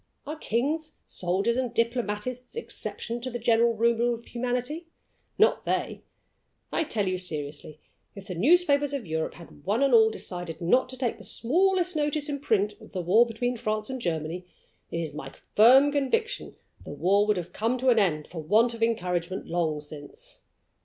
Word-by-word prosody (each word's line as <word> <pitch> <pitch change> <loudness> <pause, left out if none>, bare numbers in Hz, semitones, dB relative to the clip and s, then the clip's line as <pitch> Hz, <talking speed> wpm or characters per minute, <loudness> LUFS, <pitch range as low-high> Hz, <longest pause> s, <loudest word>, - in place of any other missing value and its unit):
Are 300 +3 -4
kings, 305 +4 -2
soldiers, 195 +7 -1
and 255 -2 -1
diplomatists 235 - -2
exceptions 240 - -4
to 255 - -2
the 240 - -4
general 230 0 +3
rule 235 +1 +2
of 235 - -13
humanity? 250 +7 -3 0.5
Not 435 - +4
they! - - -2 0.7
I 330 - 0
tell 210 -8 -1
you 185 0 -1
seriously, 150 -3 -4 0.4
if 200 -1 -10
the 185 - -5
newspapers 285 - +3
of 275 -6 -3
Europe 160 -1 -2
had 165 -4 -14
one 210 - +1
and 275 -2 +3
all 220 -1 +7
decided 175 -6 -5
not 250 +10 +2
to 255 - -7
take 245 -2 -2
the - - -11
smallest 365 +7 +1
notice 295 0 0
in 285 -1 -2
print 210 -6 +1
of - - -15
the 185 - -2
war 215 +8 +5
between 245 +2 -2
France 215 +2 -2
and 260 -1 -5
Germany, 165 -1 -2 0.5
it 165 - -3
is 155 -3 -5
my 135 -2 -6 0.3
firm 260 +7 +7
conviction 445 - -1 0.3
the - - -10
war 200 +3 +2
would 210 -2 +2
have 175 0 -5
come 230 +4 0
to 260 +1 +2
an 235 -2 +5
end 155 -7 +1
for 170 -2 -7
want 220 +9 +3
of 230 - -9
encouragement 180 -5 -1
long 160 -3 -1
since. 440 - -10
230 Hz, 180 wpm, -27 LUFS, 180-260 Hz, 0.7 s, all